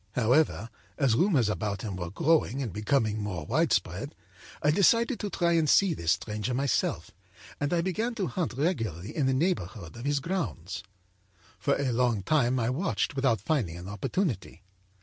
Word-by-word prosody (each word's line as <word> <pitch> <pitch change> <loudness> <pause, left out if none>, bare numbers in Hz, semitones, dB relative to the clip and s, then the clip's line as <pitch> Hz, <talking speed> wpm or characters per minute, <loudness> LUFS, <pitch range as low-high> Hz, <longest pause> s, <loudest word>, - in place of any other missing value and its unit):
âHowever, 125 -1 +2 0.3
as 135 -6 +3
rumors 145 - +3
about 105 -2 -2
him 105 -4 -4
were 90 -2 -4
growing 145 - +2
and 110 -8 -5
becoming 110 0 0
more 105 -4 -4
widespread, - - 0 0.5
I 150 - +4
decided 230 - +3
to 210 - -3
try 170 -3 +2
to 155 - 0
see 190 +4 +4
this 85 - +1
stranger 110 +3 -3
myself, 135 -1 0 0.5
and 145 0 -1
I 175 -1 +2
began 220 +7 -1
to 205 -5 -1
hunt 170 - -2
regularly 115 - -2
in 145 -4 +1
the 130 - +2
neighborhood 110 - -2
of 120 +2 -8
his 145 0 +1
grounds. 140 - -3 0.8
âFor 140 - +2
a - - +1
long 115 -4 +1
time 130 +1 +2
I 115 +1 +1
watched 165 +1 -1
without 130 -7 +1
finding 110 - -1
an 90 +1 -8
opportunity. 115 - -3
130 Hz, 170 wpm, -28 LUFS, 105-165 Hz, 0.8 s, I